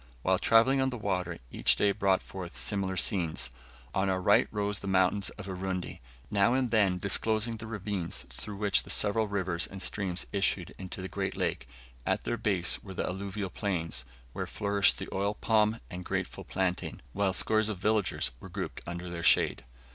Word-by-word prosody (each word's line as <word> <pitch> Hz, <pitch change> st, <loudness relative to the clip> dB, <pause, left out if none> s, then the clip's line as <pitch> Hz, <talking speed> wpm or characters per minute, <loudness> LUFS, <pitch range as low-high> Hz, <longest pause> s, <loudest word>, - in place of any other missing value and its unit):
While 95 Hz, 0 st, +3 dB
travelling 125 Hz, +6 st, +5 dB
on 130 Hz, -, +2 dB
the 125 Hz, -, -5 dB
water 90 Hz, -5 st, -2 dB
each -, -, +3 dB
day 100 Hz, -, +3 dB
brought 95 Hz, -2 st, +2 dB
forth 90 Hz, -2 st, -8 dB
similar 95 Hz, -2 st, -1 dB
scenes 85 Hz, -5 st, 0 dB, 0.4 s
on 95 Hz, 0 st, +1 dB
our 95 Hz, -1 st, +1 dB
right 100 Hz, +3 st, +4 dB
rose 105 Hz, -1 st, -1 dB
the 100 Hz, -, -7 dB
mountains 95 Hz, +1 st, +3 dB
of 100 Hz, -, -7 dB
Urundi, 95 Hz, -1 st, -4 dB, 0.3 s
now 105 Hz, +4 st, +4 dB
and 130 Hz, -3 st, 0 dB
then 100 Hz, -5 st, +3 dB
disclosing 110 Hz, +4 st, +3 dB
the 110 Hz, 0 st, -8 dB
ravines 100 Hz, -5 st, -3 dB
through 105 Hz, -2 st, -7 dB
which 100 Hz, -2 st, +2 dB
the -, -, -13 dB
several 105 Hz, +1 st, +4 dB
rivers 90 Hz, -4 st, -1 dB
and 95 Hz, -, -9 dB
streams 95 Hz, -2 st, -1 dB
issued 95 Hz, -2 st, 0 dB
into 95 Hz, 0 st, -6 dB
the -, -, -3 dB
great 95 Hz, 0 st, -3 dB
lake; -, -, -1 dB, 0.4 s
at -, -, 0 dB
their 120 Hz, -, -1 dB
base 95 Hz, -6 st, +2 dB
were 95 Hz, -2 st, -9 dB
the -, -, -1 dB
alluvial 100 Hz, +1 st, -4 dB
plains, 85 Hz, -, -2 dB, 0.3 s
where -, -, -3 dB
flourished 100 Hz, -1 st, +2 dB
the -, -, -5 dB
oil 100 Hz, +2 st, 0 dB
palm 110 Hz, 0 st, +2 dB
and 90 Hz, 0 st, -6 dB
grateful -, -, -3 dB
plantain, 90 Hz, -1 st, -2 dB
while 100 Hz, -1 st, +1 dB
scores 110 Hz, +3 st, +2 dB
of 105 Hz, -, -3 dB
villages 105 Hz, -, 0 dB
were -, -, -10 dB
grouped -, -, -5 dB
under 85 Hz, +1 st, -5 dB
their 85 Hz, -1 st, -5 dB
shade. 80 Hz, -, +4 dB
100 Hz, 185 wpm, -30 LUFS, 90-105 Hz, 0.4 s, travelling